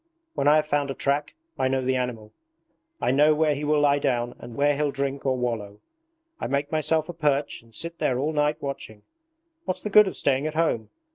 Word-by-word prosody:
When 140 - 0
I 150 - +7
have 155 0 +3
found 145 -2 0
a 135 - -3
track 145 - -1 0.2
I 130 - +2
know 135 0 +1
the 130 0 0
animal. 120 -4 -4 0.7
I - - +1
know 150 +3 +4
where 155 -1 +2
he 145 +1 -5
will 150 0 +2
lie 145 -1 +3
down 120 -3 0
and 120 - -10
where 145 0 +2
he'll 150 0 0
drink 140 0 -3
or 130 -1 +1
wallow. 110 -5 -3 0.6
I - - -3
make 140 +1 -1
myself 155 0 +1
a 175 - -6
perch 145 -3 0
and 115 0 -22
sit 170 +9 -4
there 125 - +1
all 150 +4 -1
night 150 0 +1
watching. 110 -6 -6 0.6
What's 185 0 -3
the 210 - -4
good 210 0 +7
of 190 - -5
staying 140 +1 +1
at 155 - -5
home? 155 -9 0
140 Hz, 220 wpm, -25 LUFS, 130-150 Hz, 0.7 s, I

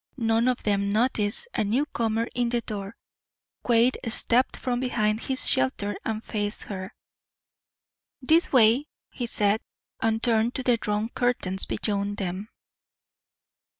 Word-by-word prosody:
None 225 0 +1
of 250 -1 0
them 200 -1 0
noticed 220 - 0
a - - 0
newcomer 230 -1 -1
in 240 -1 0
the 240 0 0
door. 200 -1 -6 0.7
Quade 240 +1 +3
stepped 240 +2 +3
from 245 -1 -2
behind 215 -4 0
his 265 +3 -2
shelter 200 +11 0
and 220 0 -3
faced 205 -1 -3
her. 190 -2 -7 1.3
"This 315 +6 +3
way," 250 +3 +5 0.2
he 245 - -4
said, 210 -1 +2 0.4
and 225 0 0
turned 230 0 +1
to 260 - -2
the 245 -2 +3
drawn 210 0 -2
curtains 240 -7 +1
beyond 205 -1 -2
them. 190 +2 -4
225 Hz, 130 wpm, -26 LUFS, 205-245 Hz, 1.3 s, way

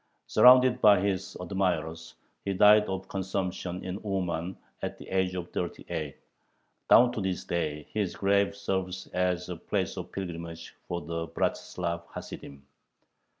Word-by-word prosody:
Surrounded 125 0 +6
by 105 -2 +7
his 95 0 -2
admirers, 85 -3 -2 0.3
he 100 -1 -2
died 105 +2 +7
of 95 0 -4
consumption, 95 -1 -3
in 95 +2 -4
Uman, 95 -3 -2 0.2
at - - -4
the - - -11
age 95 -1 0
of 90 -1 -5
thirty 90 - -4
eight. 80 -5 -4 0.7
Down 120 0 +7
to 115 - -3
this 95 -2 -2
day 75 -3 -2
his 105 -4 -1
grave 100 0 +2
serves 95 -2 -3
as 90 -1 0
a 90 - -4
place - - -2
of - - -6
pilgrimage 85 -3 -6
for 85 0 -3
the 85 0 -4
"Bratzlav 85 0 -2
Hasidim." 70 0 -9
90 Hz, 145 wpm, -29 LUFS, 85-100 Hz, 0.7 s, by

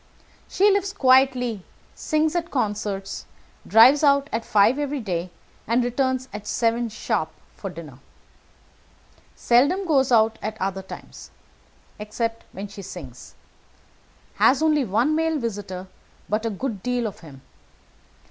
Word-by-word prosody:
She 405 +2 +3
lives 395 0 0
quietly, 255 -5 +3 0.3
sings 310 +1 0
at 340 0 -1
concerts, 205 -5 -3 0.4
drives 250 +7 +6
out 280 0 +3
at 225 +1 -2
five 220 +7 +3
every 290 -1 -2
day, 180 -5 -3 0.4
and 235 +3 +2
returns 260 +1 -1
at 210 0 -7
seven 235 0 0
sharp 185 -6 -2 0.3
for 195 - -6
dinner. 155 -7 -11 1.4
Seldom 285 +11 +2
goes 270 -6 +2
out 220 -1 +3
at 215 +1 -5
other 190 0 -2
times, 190 - -11 0.7
except 225 +2 -4
when 195 +2 -7
she 200 0 -10
sings. 150 -10 -10 1.0
Has 275 +4 +4
only 305 -2 +3
one 235 +9 +1
male 320 0 +1
visitor, 200 -7 -5 0.4
but 215 +2 -1
a - - 0
good 215 -1 -4
deal 245 0 -1
of 210 - -5
him. 140 -5 -14
230 Hz, 130 wpm, -23 LUFS, 200-275 Hz, 1.4 s, drives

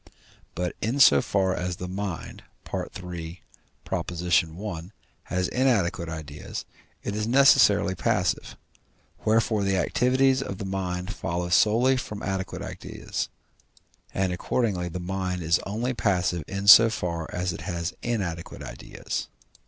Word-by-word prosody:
But 90 0 -2
in 120 +7 -1
so 70 - +7
far 95 +2 +1
as 90 0 -2
the 90 - -6
mind 95 -2 -5 0.3
(III. 85 -2 -6 0.5
i.) 85 +1 -1 0.3
has 90 0 -1
inadequate 100 -10 +1
ideas, 75 -2 -6 0.4
it 100 - -3
is 105 +1 -1
necessarily 115 -7 +5
passive: 90 - -1 0.7
wherefore 110 -1 +2
the 95 -1 +1
activities 130 +8 +2
of 100 -8 -5
the 100 - -5
mind 95 0 -3
follow 85 +1 -3
solely 115 +8 +4
from 105 -4 -5
adequate 95 -1 -3
ideas, - - -5 0.8
and 95 -1 0
accordingly 90 -2 -1
the 90 +2 -5
mind 90 0 -3
is 80 +1 +3
only 115 +6 -1
passive 90 -7 0
in 100 0 -4
so 115 +2 +10
far 85 -7 -3
as 90 0 -2
it - - -7
has 85 -1 -3
inadequate 95 -8 -3
ideas. - - -5
95 Hz, 130 wpm, -26 LUFS, 90-105 Hz, 0.8 s, so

